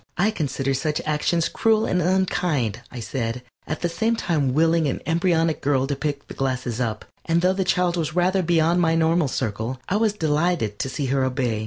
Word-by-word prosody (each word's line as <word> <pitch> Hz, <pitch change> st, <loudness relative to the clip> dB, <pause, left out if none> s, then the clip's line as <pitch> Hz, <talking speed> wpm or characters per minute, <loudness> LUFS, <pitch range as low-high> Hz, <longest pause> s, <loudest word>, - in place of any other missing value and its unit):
"I 200 Hz, +5 st, +3 dB
consider 135 Hz, -7 st, -2 dB
such 150 Hz, +3 st, -1 dB
actions 155 Hz, +2 st, +1 dB
cruel 220 Hz, -1 st, +2 dB
and 180 Hz, -, +1 dB
unkind," 170 Hz, -, 0 dB
I 125 Hz, -, -7 dB
said, 120 Hz, +1 st, -3 dB, 0.2 s
at 155 Hz, -, -4 dB
the 175 Hz, -, +1 dB
same 220 Hz, +7 st, 0 dB
time 155 Hz, -, 0 dB
willing 160 Hz, +2 st, +3 dB
an 135 Hz, -, -2 dB
embryonic 165 Hz, 0 st, +1 dB
girl 135 Hz, -2 st, +1 dB
to 140 Hz, +1 st, -2 dB
pick 145 Hz, -1 st, -4 dB
the -, -, -8 dB
glasses 130 Hz, -3 st, -2 dB
up, 110 Hz, -3 st, -2 dB, 0.2 s
and 170 Hz, +1 st, +1 dB
though 185 Hz, +1 st, +4 dB
the 190 Hz, 0 st, 0 dB
child 180 Hz, -1 st, +1 dB
was 165 Hz, -1 st, -2 dB
rather 185 Hz, +2 st, +2 dB
beyond 170 Hz, 0 st, +2 dB
my 165 Hz, -1 st, +3 dB
normal 165 Hz, -1 st, +2 dB
circle, 115 Hz, 0 st, -3 dB
I 200 Hz, -, +1 dB
was 220 Hz, -1 st, +2 dB
delighted 155 Hz, -, 0 dB
to 135 Hz, -, -2 dB
see 140 Hz, +1 st, -3 dB
her 135 Hz, -1 st, +2 dB
obey. 125 Hz, -4 st, -1 dB
155 Hz, 200 wpm, -23 LUFS, 130-175 Hz, 0.2 s, though